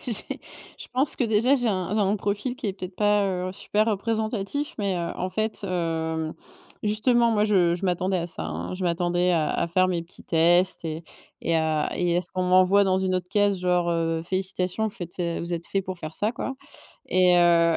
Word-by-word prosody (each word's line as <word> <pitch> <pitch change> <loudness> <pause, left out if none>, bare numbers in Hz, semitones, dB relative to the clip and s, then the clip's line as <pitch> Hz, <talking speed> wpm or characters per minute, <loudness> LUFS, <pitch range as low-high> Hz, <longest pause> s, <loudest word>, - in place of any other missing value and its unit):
j'ai 230 -4 -1 0.4
je - - -5
pense 270 +3 +1
que 250 - +1
déjà 230 +5 +3
j'ai 245 -4 +1
un 185 -1 -1
j'ai 215 - +2
un 205 +1 +2
profil 205 +5 -2
qui 260 -5 -5
est 195 - -1
peut-être 185 -1 -8
pas, 205 -1 +3 0.2
heu, - - -5
super 210 +2 0
représentatif, 220 +5 -2
mais 195 -3 0
heu, 170 -1 -3
en 185 - -3
fait 215 +3 -1
hem, 160 -3 -2 0.5
justement 230 +3 +3
moi 210 -1 +2
je 180 -5 +3
je 180 - -5
m'attendais 185 +1 0
à 170 - -2
ça 165 - -4
hein. 85 - -5
Je 185 - -6
m'attendais 175 +1 +1
à 155 -3 +1
à 170 - 0
faire 185 +2 +2
mes 175 -2 -1
petits 170 - -10
tests 175 +2 +3
et 160 +1 -5 0.4
et 165 - 0
à 160 -1 +1
et 175 -1 +1
à - - +3
ce - - -3
qu'on 185 0 -1
m'envoie 185 +2 +5
dans 190 -1 +2
une 190 -1 0
autre 180 -1 -2
case 205 -2 +2
genre, 180 -1 +1
heu: 165 -1 0
«Félicitations, 185 +2 -1
vous 215 - -1
faites, 175 0 -8
heu, 170 -1 -1
vous 170 +1 -5
êtes 170 0 -4
fait 195 - -1
pour 185 -1 -6
faire 155 -1 -7
ça» 215 +2 0
quoi 265 - -4 0.5
et 180 -1 +4
heu 170 -1 +4
185 Hz, 220 wpm, -25 LUFS, 170-205 Hz, 0.5 s, m'envoie